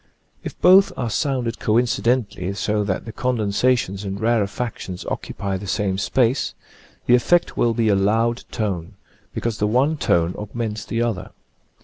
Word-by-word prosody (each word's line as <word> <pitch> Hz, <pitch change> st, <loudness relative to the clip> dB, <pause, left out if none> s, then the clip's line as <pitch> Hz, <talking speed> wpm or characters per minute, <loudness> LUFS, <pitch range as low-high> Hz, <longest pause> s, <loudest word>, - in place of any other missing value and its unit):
If -, -, -7 dB
both 190 Hz, +2 st, +6 dB
are 120 Hz, -3 st, -2 dB
sounded 125 Hz, -3 st, -1 dB
coincidently, 115 Hz, -4 st, +1 dB
so 105 Hz, 0 st, 0 dB
that 95 Hz, -2 st, -2 dB
the 115 Hz, -, -7 dB
condensa 125 Hz, 0 st, +1 dB
tions 100 Hz, -3 st, -4 dB
and 100 Hz, 0 st, -4 dB
rarefactions 110 Hz, -4 st, -2 dB
occupy 95 Hz, 0 st, -3 dB
the 100 Hz, +1 st, -8 dB
same 95 Hz, 0 st, -1 dB
space, 130 Hz, +4 st, +1 dB, 0.5 s
the 125 Hz, -, +4 dB
effect 170 Hz, +8 st, +3 dB
will 115 Hz, -1 st, +1 dB
be 115 Hz, -1 st, +1 dB
a 105 Hz, -, +4 dB
loud 115 Hz, +4 st, +1 dB
tone, 95 Hz, -7 st, -3 dB, 0.4 s
because 115 Hz, -2 st, -3 dB
the 105 Hz, -, +2 dB
one 135 Hz, +8 st, +2 dB
tone 85 Hz, -, +1 dB
augments 105 Hz, 0 st, -4 dB
the 115 Hz, +1 st, -1 dB
other. 95 Hz, -6 st, -3 dB
110 Hz, 150 wpm, -22 LUFS, 100-120 Hz, 0.5 s, both